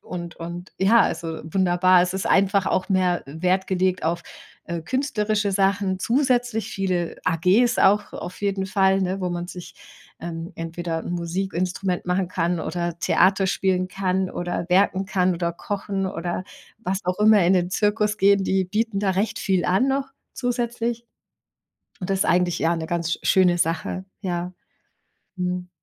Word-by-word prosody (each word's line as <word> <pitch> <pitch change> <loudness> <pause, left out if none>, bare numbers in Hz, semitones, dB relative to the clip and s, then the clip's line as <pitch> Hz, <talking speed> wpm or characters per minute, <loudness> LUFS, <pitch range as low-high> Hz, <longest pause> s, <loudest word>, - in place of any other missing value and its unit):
und 170 -1 -7
und 170 +2 -7
ja, 220 +5 +5
also 165 -1 -3
wunderbar. 180 +1 +3
Es 180 +1 -2
ist 190 - -2
einfach 195 0 +3
auch 185 - 0
mehr 185 -2 +1
Wert 180 +6 0
gelegt 185 -1 +1
auf, 170 +1 -1 0.4
äh, 170 -1 -4
künstlerische 210 - -1
Sachen 195 -1 +1
zusätzlich 245 -4 +1
viele 185 -4 -2
AGs 190 +9 +3
auch 205 +2 +3
auf 180 - -7
jeden 195 -1 -1
Fall, 190 0 +2
ne, 190 +1 -2
wo 180 -1 -1
man 175 0 -3
sich, 180 -1 -9 0.4
ähm, 165 0 -6
entweder 165 0 -4
'n - - -4
Musikinstrument 180 +1 -2
machen 180 +1 +1
kann 175 -1 -1
oder 170 -1 -3
Theater 190 +2 +3
spielen 185 -1 +1
kann 190 0 -1
oder 175 0 -3
werken 190 +1 +2
kann 185 -1 +1
oder 170 0 -2
kochen 195 +2 -3
oder 175 -1 -3 0.4
was 195 -3 -3
auch 180 0 -1
immer, 210 -3 +6
in 180 - +4
den 180 -1 +1
Zirkus 210 +1 +1
gehen, 200 0 +4
die 190 0 +1
bieten 215 +2 -1
da 200 -1 +1
recht 200 +4 -1
viel 190 -3 0
an 190 +9 +2
noch 270 0 0 0.2
zusätzlich. 240 -1 -2 0.9
Und 180 - -5
das 195 -1 +1
ist - - +2
eigentlich 175 0 +2
ja 165 +1 +2
'ne 160 -1 -4
ganz 170 -1 -2
sch - - -6
schöne 180 -2 +4
Sache, 165 +3 -1 0.2
ja. 180 -2 -3 0.9
Mhm. 180 0 -3
185 Hz, 165 wpm, -23 LUFS, 175-200 Hz, 0.9 s, immer